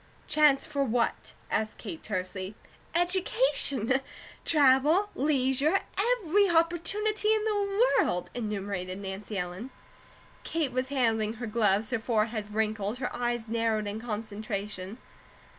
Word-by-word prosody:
"Chance 300 Hz, -3 st, +4 dB
for 285 Hz, -2 st, -1 dB
what?" 240 Hz, -2 st, -1 dB, 0.2 s
asked 220 Hz, 0 st, -1 dB
Kate 325 Hz, -3 st, -7 dB
tersely. 185 Hz, 0 st, -4 dB, 0.4 s
"Education, 345 Hz, -, +2 dB, 0.4 s
travel, 300 Hz, +6 st, +4 dB
leisure, 275 Hz, +4 st, +2 dB
every 405 Hz, -3 st, +2 dB
opportunity 350 Hz, +6 st, +1 dB
in 430 Hz, -, -1 dB
the 415 Hz, +2 st, +2 dB
world," 180 Hz, -, -2 dB
enumerated 200 Hz, -5 st, -3 dB
Nancy 195 Hz, +1 st, -6 dB
Ellen. 180 Hz, +6 st, -4 dB, 0.7 s
Kate 320 Hz, -5 st, -1 dB
was 255 Hz, +1 st, -1 dB
handling 225 Hz, -5 st, +1 dB
her 235 Hz, +1 st, -6 dB
gloves, 210 Hz, -1 st, +2 dB
her 245 Hz, -, 0 dB
forehead 220 Hz, -2 st, -1 dB
wrinkled, 215 Hz, 0 st, -1 dB
her 250 Hz, -1 st, -4 dB
eyes 240 Hz, -1 st, -2 dB
narrowed 225 Hz, -1 st, 0 dB
in 210 Hz, +2 st, -4 dB
concentration. 210 Hz, -3 st, -4 dB
240 Hz, 115 wpm, -29 LUFS, 210-320 Hz, 0.7 s, Chance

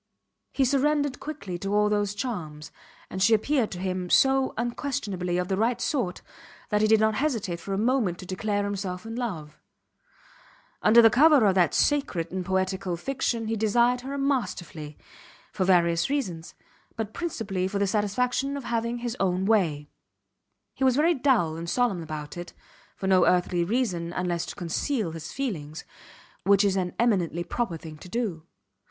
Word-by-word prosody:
He 270 Hz, -, +2 dB
surrendered 285 Hz, +1 st, +1 dB
quickly 200 Hz, -, -6 dB
to 195 Hz, +3 st, -2 dB
all 210 Hz, 0 st, +4 dB
those 205 Hz, -1 st, 0 dB
charms, 160 Hz, -, -5 dB, 0.4 s
and 190 Hz, -, -4 dB
she 225 Hz, +3 st, +6 dB
appeared 245 Hz, +1 st, +1 dB
to 180 Hz, -, -7 dB
him 185 Hz, -1 st, -3 dB
so 270 Hz, +3 st, +4 dB
unquestionably 225 Hz, -7 st, -2 dB
of 180 Hz, 0 st, -1 dB
the 190 Hz, -, -1 dB
right 230 Hz, +3 st, +1 dB
sort 235 Hz, -, -2 dB, 0.5 s
that 210 Hz, -1 st, +1 dB
he 215 Hz, -, +4 dB
did 220 Hz, 0 st, +5 dB
not 220 Hz, 0 st, +3 dB
hesitate 220 Hz, -, -1 dB
for 195 Hz, -, -7 dB
a -, -, -2 dB
moment 225 Hz, -5 st, +1 dB
to 185 Hz, -, -9 dB
declare 205 Hz, +2 st, -1 dB
himself 195 Hz, -1 st, -4 dB
in 225 Hz, 0 st, -6 dB
love. 170 Hz, -12 st, -5 dB, 1.2 s
Under 230 Hz, +2 st, +7 dB
the 225 Hz, -, +7 dB
cover 290 Hz, -1 st, +6 dB
of 195 Hz, -, +4 dB
that 180 Hz, -4 st, +2 dB
sacred 270 Hz, -, +1 dB
and 185 Hz, 0 st, -3 dB
poetical 190 Hz, -1 st, -1 dB
fiction 240 Hz, +1 st, -2 dB
he 225 Hz, +1 st, -1 dB
desired 235 Hz, +3 st, +2 dB
her 275 Hz, +2 st, -5 dB
masterfully, 185 Hz, -, -2 dB, 0.6 s
for 185 Hz, -, 0 dB
various 170 Hz, -1 st, +3 dB
reasons; 185 Hz, -, -3 dB, 0.4 s
but 220 Hz, -2 st, -4 dB
principally 215 Hz, -, -2 dB
for 200 Hz, +1 st, -3 dB
the 200 Hz, -, +2 dB
satisfaction 245 Hz, +7 st, 0 dB
of 280 Hz, -, -6 dB
having 235 Hz, 0 st, -1 dB
his 240 Hz, 0 st, -4 dB
own 185 Hz, -1 st, +1 dB
way. 170 Hz, -9 st, +1 dB, 0.9 s
He -, -, -4 dB
was 260 Hz, -2 st, +4 dB
very 320 Hz, +5 st, +4 dB
dull 245 Hz, -, +2 dB
and 170 Hz, 0 st, -5 dB
solemn 240 Hz, -7 st, +1 dB
about 155 Hz, 0 st, -7 dB
it 175 Hz, 0 st, -7 dB, 0.4 s
for -, -, -6 dB
no 190 Hz, -2 st, +4 dB
earthly 180 Hz, -1 st, +2 dB
reason, 180 Hz, -5 st, -1 dB
unless 175 Hz, -2 st, -2 dB
to -, -, -7 dB
conceal 180 Hz, -, -2 dB
his 160 Hz, -1 st, -7 dB
feelings 160 Hz, -, -4 dB, 0.6 s
which 200 Hz, +2 st, +4 dB
is 200 Hz, -2 st, +2 dB
an 180 Hz, -2 st, -2 dB
eminently 185 Hz, -8 st, +1 dB
proper 195 Hz, -4 st, -2 dB
thing 155 Hz, -1 st, -10 dB
to 180 Hz, -, -11 dB
do. 180 Hz, -8 st, -3 dB
205 Hz, 170 wpm, -26 LUFS, 180-245 Hz, 1.2 s, Under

